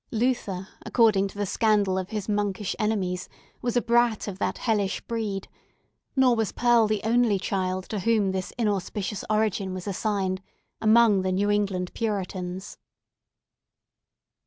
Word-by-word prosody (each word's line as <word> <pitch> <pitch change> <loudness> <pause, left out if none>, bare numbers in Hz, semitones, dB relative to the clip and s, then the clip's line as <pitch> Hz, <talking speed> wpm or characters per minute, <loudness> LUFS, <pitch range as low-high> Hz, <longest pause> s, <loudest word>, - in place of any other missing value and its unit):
Luther, 220 -6 -1 0.2
according 215 -5 +3
to 195 - -12
the 205 - 0
scandal 205 -2 +2
of 190 0 -3
his 210 -3 -4
monkish 205 -1 -1
enemies, 190 -4 -1 0.3
was 245 0 0
a 245 - +2
brat 235 -2 +2
of 195 -2 -6
that - - -1
hellish 210 -4 0
breed; 215 -4 -3 0.7
nor 260 -3 +5
was 225 -2 0
Pearl 240 -2 +4
the 215 -1 0
only 230 -2 +3
child 185 -1 -2
to 215 - -2
whom 210 -1 +2
this 190 -1 -3
inauspicious 205 -2 -2
origin 210 -3 0
was 185 - -6
assigned 195 -2 -1 0.4
among 220 -2 +5
the 185 0 -1
New 200 +3 +1
England 195 -3 0
Puritans. 190 -3 -4
205 Hz, 140 wpm, -26 LUFS, 190-225 Hz, 0.7 s, nor